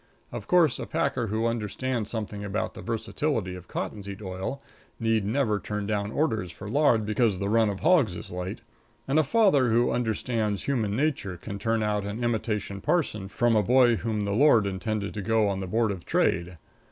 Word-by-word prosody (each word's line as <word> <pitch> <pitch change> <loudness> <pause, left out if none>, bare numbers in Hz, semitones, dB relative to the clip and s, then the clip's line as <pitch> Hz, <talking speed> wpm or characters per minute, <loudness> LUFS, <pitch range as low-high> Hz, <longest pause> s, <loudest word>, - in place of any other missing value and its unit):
Of 120 -4 -7
course, 170 -7 +4
a - - -5
packer 130 -7 0
who 110 +2 -1
understands 115 +1 -2
something 105 -2 -4
about 105 +1 -2
the - - -9
versatility 115 -2 -2
of 90 -1 -10
cottonseed 100 -1 -5
oil 95 +8 -4 0.4
need 115 -2 +1
never 110 -2 +1
turn 105 0 -4
down 105 0 -1
orders 110 - 0
for 95 +4 -9
lard 120 -3 +3
because 105 -2 +1
the 100 +2 -2
run 110 0 +3
of 100 -1 -4
hogs 155 - +4
is - - -8
light, 90 +4 -5 0.5
and 140 +4 +3
a - - +4
father 145 - +3
who 120 +2 +3
understands 110 -3 -1
human 110 -7 0
nature 130 - -1
can 100 +3 -7
turn 115 +1 0
out 105 -1 0
an 105 +4 -4
imitation 105 -4 -2
parson 120 - 0
from 120 +3 +1
a 105 - +5
boy 120 +2 +4
whom 110 -1 -2
the 100 0 -1
Lord 115 -1 +5
intended 100 +2 -3
to 105 - -4
go 110 +1 +2
on 100 -1 -1
the 95 - -4
Board 110 +2 +1
of 90 -3 -6
Trade. 85 +1 0
110 Hz, 190 wpm, -27 LUFS, 100-120 Hz, 0.5 s, a